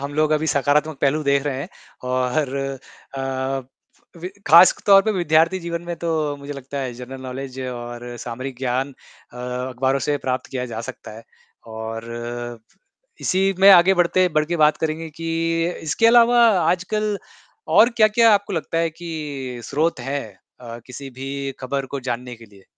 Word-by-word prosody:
हम 140 +1 -5
लोग 155 0 +2
अभी 155 +1 +1
सकारात्मक 145 0 +1
पहलू 150 +2 +2
देख 140 -1 +2
रहे 135 -2 -2
हैं - - -6 0.4
और 130 +2 0 0.6
अ, - - -3 1.0
अवी 170 +2 -6 0.2
खासतौर 185 +4 +7
पे 220 - 0
विद्यार्थी 165 0 +2
जीवन 170 0 -4
में 175 0 -4
तो, 155 -3 -1
मुझे 140 +1 -8
लगता 140 0 -7
है, 130 -3 -3
जनरल 125 +2 -9
नौलेज 130 0 -7
और 120 0 -7
सामरिक 130 +2 -6
ज्ञान 130 +1 -2 0.4
अ, - - -13
अखबारों 125 +2 -1
से 145 - +2
प्राप्त 130 0 -1
किया 130 -2 -3
जा 110 - -4
सकता 130 - -13
है। 115 - -11 0.5
और 110 0 -6 1.2
इसी 195 +1 +1
में 195 +1 +8
आगे 190 0 +7
बढ़ते 180 +1 +3
बढ़ 155 - +2
के 170 +2 -1
बात 155 -1 +4
करेंगे 160 +1 -3
कि 165 +2 -7 0.5
इसके 160 +9 +2
अलावा 240 +1 +6 0.2
आजकल 205 +4 0 0.6
और 230 - +8
क्या-क्या 225 +1 +5
आपको 200 0 -1
लगता 165 -1 -2
है 165 0 +1
कि 170 +2 -9 0.5
स्रोत 150 +3 0
है 135 +3 -2 0.4
अ, 120 -1 -8
किसी 135 +2 -9
भी 135 +1 -5 0.3
खबर 135 +1 -3
को 140 +1 -5
जानने 125 +1 -4
के 115 - -14
लिए? 100 -2 -20
145 Hz, 165 wpm, -21 LUFS, 130-170 Hz, 1.2 s, में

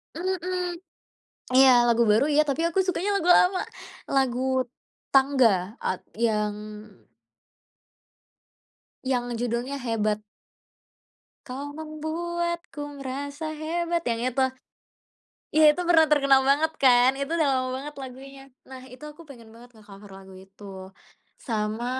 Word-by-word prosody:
Mhm. 360 0 -2 0.8
Iya, 265 +1 +7 0.2
lagu 235 0 +3
baru 215 +6 +4
iya, 300 - +5
tapi 280 +4 -1
aku 340 - -1
sukanya 375 +2 -1
lagu 355 -1 -1
lama, 370 +1 +3 0.5
lagu 260 -2 +1 0.7
Tangga 245 -8 +3
at 185 - -2 0.2
yang 210 -2 0 2.5
yang 245 -2 -1
judulnya 245 +3 -3
"Hebat." 215 -3 -1 1.3
"Kau 270 +2 -6
membuatku 315 -1 -5
merasa 285 +3 -5 0.2
hebat," 340 +1 -1
yang 230 0 -1
itu. 260 +2 -1 1.1
Iya 310 0 +5
itu 360 - -5
pernah 320 -2 +6
terkenal 275 -2 +5
banget 310 +3 +2
kan, 250 -1 +6
itu 280 +3 -3
udah 310 -4 +2
lama 255 0 -1
banget 295 +2 -7
lagunya. 270 +1 -10 0.3
Nah, 260 -1 -9
itu 260 - -12
aku 300 +3 -14
pengen 235 -5 -13
banget 240 +1 -15
nge-cover 205 -2 -15
lagu 190 0 -14
itu. 195 +2 -16 0.8
Sama, 220 0 -2
270 Hz, 115 wpm, -25 LUFS, 235-315 Hz, 2.5 s, Iya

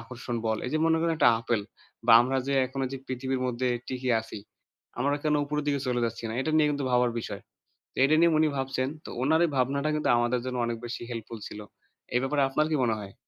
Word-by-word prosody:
আকর্ষণ 120 +1 -6
বল। 110 0 0
এই - - -3
যে - - +2
মনে 165 0 +3
করেন 165 0 +1
একটা 120 - +6
apple 115 -2 0 0.4
বা 115 - +7
আমরা 130 +2 -1
যে 140 - +1
এখন 135 +1 -6
এইযে 135 +1 -5
পৃথিবীর 130 0 -2
মধ্যে 125 +1 -1 0.2
টিকে 130 0 -3
আছি, 110 -1 -8 0.6
আমরা 140 +2 +1
কেনো 150 -1 +2
উপরের 150 0 -2
দিকে 140 -1 +1
চলে 120 -1 0
যাচ্ছি 115 0 -6
না? - - -4
এটা 155 - -1
নিয়ে 150 -1 +4
কিন্তু 145 -1 -2
ভাবার 125 -1 +3
বিষয়। 100 -3 -7 0.5
তো - - -23
এটা 155 - +4
নিয়ে 170 -1 +5
উনি 155 - +4
ভাবছেন। 135 -1 -1 0.2
তো - - -7
ওনার 160 +5 +3
এই 160 - -2
ভাবনাটা 140 +4 +1
কিন্তু 150 - 0
আমাদের 120 +1 +1
জন্য 125 -1 -3
অনেক 115 -1 -3
বেশি 120 - -5
helpful 115 -1 -6
ছিল। 105 - -9 0.6
এ - - +6
ব্যাপারে 140 +1 +1
আপনার 150 +3 +1
কি - - +2
মনে 115 -3 +1
হয়? 100 -1 -9
130 Hz, 230 wpm, -27 LUFS, 120-145 Hz, 0.6 s, বা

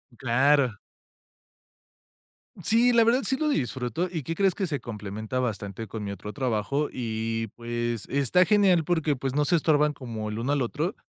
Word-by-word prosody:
Claro. 130 -1 +2 1.9
Sí, 230 +5 +4
la 235 -1 +5
verdad 235 +4 +3
sí 265 - 0
lo 310 +1 0
disfruto, 130 - -1
¿y 160 -5 -3
qué 165 - -3
crees? 190 +1 +2
Que 195 - -1
se 150 -5 -2
complementa 110 +1 -5
bastante 110 -3 -3
con 110 +1 -6
mi 100 - -4
otro 105 +2 -7
trabajo 130 +2 -1
y, 115 -1 -3
pues, 120 -1 -3
está 140 +6 +3
genial 195 -5 +4
porque, 160 -3 +1
pues, 135 0 -3
no 150 0 +2
se 175 - +3
estorban 150 -2 +3
como 115 -6 -6
el 105 +1 -4
uno 130 +5 0
al 145 - +1
otro. 150 - -2
135 Hz, 175 wpm, -26 LUFS, 115-165 Hz, 1.9 s, la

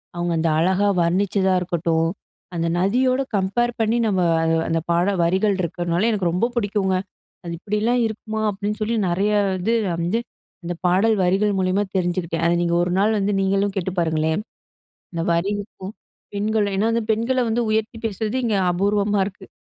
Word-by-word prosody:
அவுங்க 175 0 -1
அந்த 165 0 +1
அழகா 190 +4 +2
வர்ணிச்சதா 190 +2 +1
இருக்கட்டும். 165 -2 0 0.5
அந்த 165 0 -1
நதியோட 255 +7 +2
கம்பேர் 220 +6 +1
பண்ணி 225 +1 +2
நம்ம 190 -4 +1 0.2
அ - - 0 0.2
அந்த 165 0 +1
பாடல் 180 +3 +1
வரிகள் 190 +4 +2
இருக்கன்னாலே, 175 +4 0
எனக்கு 195 -5 0
ரொம்ப 185 +7 +1
புடிக்குங்க. 205 -4 0 0.5
அது 170 -1 -5
இப்பிடிலாம் 215 +6 0
இருக்குமா! 220 0 -5
அப்பிடின்னு 205 +2 -3
சொல்லி, 230 +2 0
நிறைய 200 +4 +1 0.3
இது 225 +6 0 0.2
வந்து 175 +7 0 0.4
அந்த 175 +1 -3
பாடல் 195 +5 +3
வரிகள் 200 +3 +2
மூலியமா 185 +2 +1
தெரிஞ்சுக்கிட்டேன். 175 -2 -1
அத 170 - +3
நீங்க 170 0 +1
ஒரு 175 - -1
நாள் 215 +1 +2
வந்து 200 +1 0
நீங்களும் 195 +1 +1
கேட்டு 190 0 -2
பாருங்களே! 160 -1 +1 0.8
இந்த 165 -1 -2
வரிக்கும். 200 +2 -3 0.4
பெண்கள் 210 0 0
ஏனா, 200 +3 +1
வந்து 230 -1 0
பெண்கள 240 +4 0
வந்து 235 +2 +1
உயர்த்தி 220 +1 -1
பேசுறது 215 +3 -3
இங்க 220 -4 +1 0.2
அபூர்வமா 200 +2 +1
இருக்கு. 195 -1 -9
195 Hz, 155 wpm, -22 LUFS, 175-215 Hz, 0.8 s, பாடல்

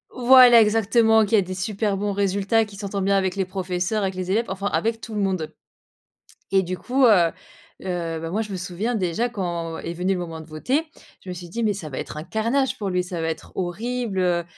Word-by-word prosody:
Voilà 250 -2 +8
exactement, 220 +1 +4
qui 210 - +2
a 210 - +5
des 185 0 -5
super 200 +2 -1
bons 205 +1 -1
résultats, 200 +3 +1
qui 200 -1 -13
s'entend 200 -1 -4
bien 195 +1 +2
avec 190 -1 0
les 195 -2 0
professeurs, 185 +2 -2
avec 190 -1 -2
les 185 0 -3
élèves, 230 +3 +1
enfin 195 +1 -3
avec 225 +2 -1
tout 225 - -8
le 210 - -1
monde. 185 -5 -1 1.0
Et 195 0 +3
du 185 +1 -4
coup, 260 +5 +1
heu 175 -7 +5 0.5
heu, 170 -3 -3
bah, 165 0 -5
moi 215 +4 0
je 210 - -8
me - - -3
souviens 190 +6 -3
déjà 195 +6 0
quand, 170 -6 -4
est 170 - -5
venu 180 +3 0
le - - -3
moment 165 -2 -6
de 160 - -11
voter, 250 - -1 0.4
je - - -12
me - - -4
suis 175 0 -9
dit: 230 +7 -4
«Mais 210 - +2
ça 185 -6 -7
va 130 - -6
être - - -6
un 155 - -5
carnage 235 +7 0
pour 205 - -3
lui, 180 0 0
ça 180 -2 -5
va 160 - -1
être 160 - -6
horrible, 215 +3 -3
heu, 175 -2 +1
195 Hz, 235 wpm, -23 LUFS, 180-220 Hz, 1.0 s, Voilà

